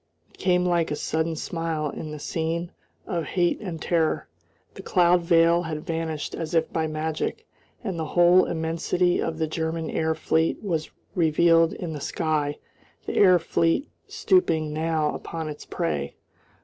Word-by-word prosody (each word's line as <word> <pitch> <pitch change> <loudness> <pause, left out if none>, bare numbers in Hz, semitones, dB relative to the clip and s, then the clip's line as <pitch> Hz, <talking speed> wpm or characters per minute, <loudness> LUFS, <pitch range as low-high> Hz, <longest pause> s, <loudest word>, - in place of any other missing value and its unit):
It - - -23
came 180 -1 +2
like 170 -2 +1
a 150 - -1
sudden 160 +2 -1
smile 160 -2 -3
in 155 - -7
a 150 - -6
scene 165 +3 -3 0.3
of 170 -2 -2
hate 175 +3 0
and 175 -6 -5
terror. 165 -2 0 0.5
The - - -9
cloud 175 -1 +3
veil 170 0 +4
had 160 -2 -5
vanished 160 -3 -3
as 165 +1 -4
if 165 - +1
by 160 -1 0
magic, 155 0 -3 0.4
and 190 -7 -3
the 160 - -1
whole 175 +1 +6
immensity 170 +2 0
of 160 - -2
the 160 - 0
German 160 +1 -3
air 160 0 0
fleet 160 +4 0
was 165 -6 -2 0.2
revealed 165 0 +4
in 170 -3 -5
the 150 - -6
sky; 150 -2 -1 0.5
the - - -3
air 185 -3 +6
fleet 165 - 0 0.2
stooping 160 - +1
now 155 -1 0
upon 165 -1 -5
its 150 -1 -8
prey. 70 -4 -2
165 Hz, 160 wpm, -25 LUFS, 155-170 Hz, 0.5 s, whole